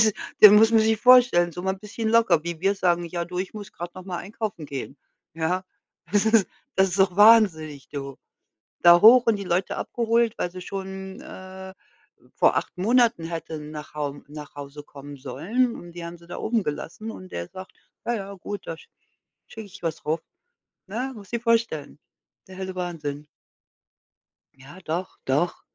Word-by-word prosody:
Das 215 -1 +5 0.3
das 210 - +12
muss 220 +2 +7
man 225 - +6
sich 220 0 +3
vorstellen, 240 -8 +6
so 175 - -6
mal 190 0 0
'n - - -16
bisschen 220 +1 -4
locker, 225 -8 +4
wie 170 -2 -5
wir 195 +1 +2
sagen: 175 -2 +1
„Ja 170 0 -3
du, 180 0 -5
ich 185 - -3
muss 205 -3 -8
grad 175 +1 -7
noch 185 -1 -10
mal 180 -2 -5
einkaufen 200 -4 -5
gehen.“ 140 0 -6 0.4
ja? 175 +3 -1 0.5
Das 205 0 +3
ist 220 -4 +4 0.3
das 190 0 +4
ist 195 - -3
doch 190 -2 +3
wahnsinnig, 185 - +5
du. 140 -2 -6 0.7
Da 175 0 +8
hoch 245 +3 +8
und 220 -3 +3
die 200 - -6
Leute 180 +2 -1
abgeholt, 235 -1 0
weil 175 - -2
sie 185 - -9
schon, 190 0 -7
äh, 190 0 -10 0.6
vor - - +3
8 - - -4
Monaten 230 -2 +3
hätten 160 -2 -6
nach 150 0 -9
Haum 145 -1 -4
nach 150 -1 -10
Hause 145 +1 -9
kommen 145 0 -11
sollen 180 - -1
und 175 -1 -11
die 170 -1 -7
haben 170 +1 -8
sie 170 0 -19
da - - -7
oben 220 -2 0
gelassen 175 +8 -5
und 185 -4 -11
der 85 0 -5
sagt: 185 0 -10 0.3
„Ja, 240 - 0
ja, 200 -1 -6
gut, 200 +2 -7
da 165 - -4
sch - - -17 0.6
schicke 220 -1 -9
ich 185 - -14
was 165 -1 -4
rauf.“ 160 +2 0 0.7
ne? 245 +7 -4
Musst 200 +1 -13
du - - +1
dir - - -19
vorstellen. 225 - 0 0.5
Der 185 - -11
helle 190 -1 -5
Wahnsinn. 150 -5 -4 1.3
Ja, 135 +6 -14
doch, 175 +4 -4
doch. 145 +7 0
185 Hz, 190 wpm, -24 LUFS, 160-215 Hz, 1.3 s, das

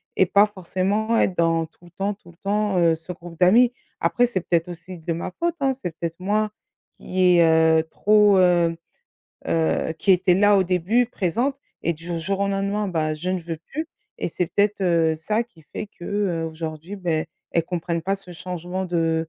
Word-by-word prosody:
et 190 - +4
pas 200 +3 +5
forcément 205 +3 -1
être 185 - +1
dans 165 -1 +2
tout 170 - -25
le 175 - -16
temps 195 +4 -2
tout 175 -4 -17
le 170 - -25
temps, 205 -1 0
heu, 165 -1 +4
ce 165 +3 -9
groupe 170 -1 -12
d'amis. 235 +7 +5 0.3
Après 245 0 +2
c'est 195 -6 -2
peut-être 170 0 0
aussi 175 +1 -8
de 165 +1 -4
ma 170 +2 -4
faute, 340 0 0
hein, 270 -1 +2
c'est 175 - -3
peut-être 165 0 -4
moi 210 +3 0 0.4
qui 180 -1 +2
est, 170 - +6 0.4
heu, 160 - 0
trop, 205 +3 +4
hem, 175 -2 +3 0.7
heu, 80 - +1
qui 195 - +1
était 180 0 +3
là 205 +1 +5
au 190 - +4
début, 190 +7 +2
présente 240 +6 -1 0.3
et 170 - +1
du 165 +2 -5
jour 195 +4 -2
au 200 - +1
lendemain, 200 +1 -1
bah, 155 -3 -1
je 180 +4 -3
ne 185 -1 -1
veux 165 -1 -5 0.2
plus 315 +3 -3 0.3
et - - -2
c'est 175 +1 -2
peut-être, 205 +2 +1
heu, 165 -3 +3
ça 215 +8 0
qui 180 -9 -22
fait 210 - -4
que, 175 - -13
heu, 190 -5 -1
aujourd'hui, 160 +4 -6
beh, 165 -4 -1 0.3
elles 165 -1 +2
comprennent 170 -1 -3
pas 195 +3 0
ce 195 -2 -11
changement 180 +2 -5
de 165 -2 0
180 Hz, 200 wpm, -23 LUFS, 165-200 Hz, 0.7 s, est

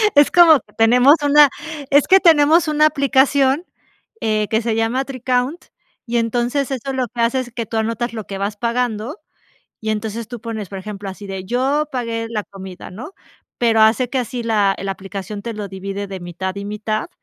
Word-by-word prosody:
Es 290 0 +6
como 330 -5 +7
que - - -27
tenemos 250 +6 +6
una 290 0 +6 0.4
es 285 0 +4
que 385 - +7
tenemos 325 -1 +5
una 305 0 +3
aplicación, 275 +1 +2 0.6
eh, 215 -1 0
que 220 +1 +1
se 225 -1 -1
llama 230 +4 0
Tricount, 255 +4 -2 0.4
y 235 0 -1
entonces 240 +4 -1
eso 270 +1 -3
lo 255 -1 -1
que 235 +1 -5
hace 240 +3 +2
es 245 -2 -9
que 230 -2 -3
tú 225 - -4
anotas 230 +2 -2
lo 220 -3 -6
que 195 - -6
vas 205 +1 -3
pagando 235 +2 -2 0.6
y 220 0 -3
entonces 220 +1 -4
tú 240 -3 -8
pones, 220 -5 -5
por 195 - -7
ejemplo, 200 0 -7
así 200 +1 -10
de: 190 -1 -6
"Yo 265 +8 0
pagué 230 -2 -3
la 215 -2 -2
comida", 190 -2 -10
¿no? 230 - -9 0.5
Pero 225 -2 +3
hace 230 +3 +3
que 265 - -1
así 240 0 -3
la 205 -4 +1
la 195 0 -3
aplicación 195 +1 -7
te 230 -1 -5
lo 210 -1 -5
divide 195 +1 -5
de 190 -2 -7
mitad 180 +2 -5
y 200 - -5
mitad. 215 +1 -3
230 Hz, 195 wpm, -19 LUFS, 210-265 Hz, 0.6 s, como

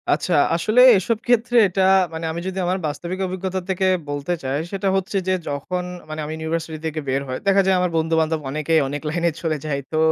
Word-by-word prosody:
আচ্ছা 180 - +1 0.2
আসলে 215 +9 +3 0.2
এসব 215 +4 0
ক্ষেত্রে 245 0 +2
এটা 190 +1 -1 0.3
মানে 160 0 -4
আমি 165 - -4
যদি 190 0 -3
আমার 180 +2 0
বাস্তবিক 175 +5 -5
অভিজ্ঞতা 185 0 -3
থেকে 190 0 0 0.2
বলতে 145 +4 -2
চাই 135 +2 -1
সেটা 195 0 -2
হচ্ছে 195 +1 -1
যে, 185 - +2 0.2
যখন 160 +6 -3 0.3
মানে 155 0 -4
আমি 155 - -5
ইউনিভার্সিটি 160 0 -4
থেকে 160 0 -2
বের 135 +1 0
হয়, 130 0 -4
দেখা 195 0 +5
যায় 190 -1 +3
আমার 180 -1 0
বন্ধু-বান্ধব 160 0 +1
অনেকেই 155 +3 +1
অনেক 145 +1 -4
লাইনে 170 +2 +1
চলে 160 -2 -1
যায়। 140 -2 -1
তো 155 - -1
165 Hz, 200 wpm, -21 LUFS, 155-190 Hz, 0.3 s, দেখা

